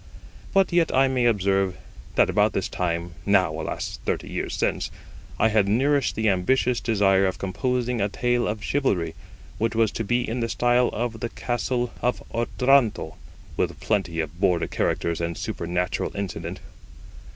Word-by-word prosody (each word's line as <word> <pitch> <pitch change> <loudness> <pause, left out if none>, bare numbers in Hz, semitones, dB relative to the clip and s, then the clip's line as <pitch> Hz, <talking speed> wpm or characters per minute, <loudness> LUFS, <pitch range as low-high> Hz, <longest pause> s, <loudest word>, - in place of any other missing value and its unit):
But 195 -2 +3
yet 170 -2 +3
I 135 +1 +5
may 130 -2 +1
observe, 95 -4 +2 0.4
that - - +5
about - - +2
this - - -1
time 85 -1 -2
(now, 95 -5 +3
alas! - - -4
thirty - - -2
years - - -3
since) - - -1 0.5
I 110 - +4
had 105 -2 +3
nourished 135 +7 +2
the 110 0 0
ambitious 115 +6 +2
desire 100 -4 +3
of 95 - -2
composing 125 +4 -1
a 100 - +1
tale 120 +3 0
of 105 -1 -3
chivalry, 95 - 0 0.5
which 115 0 0
was 115 -2 +3
to 115 - -3
be 120 +3 0
in 115 +3 -2
the 115 -1 -1
style 120 +1 +3
of 115 0 -3
the 120 - -3
Castle 120 0 -2
of 125 +1 0
Otranto, 120 - +2 0.4
with - - -1
plenty 95 -6 -1
of 80 +2 -7
Border 90 -2 +2
characters 85 0 -1
and 85 0 -2
supernatural 90 +1 -2
incident. 90 -2 -5
110 Hz, 160 wpm, -25 LUFS, 95-120 Hz, 0.5 s, I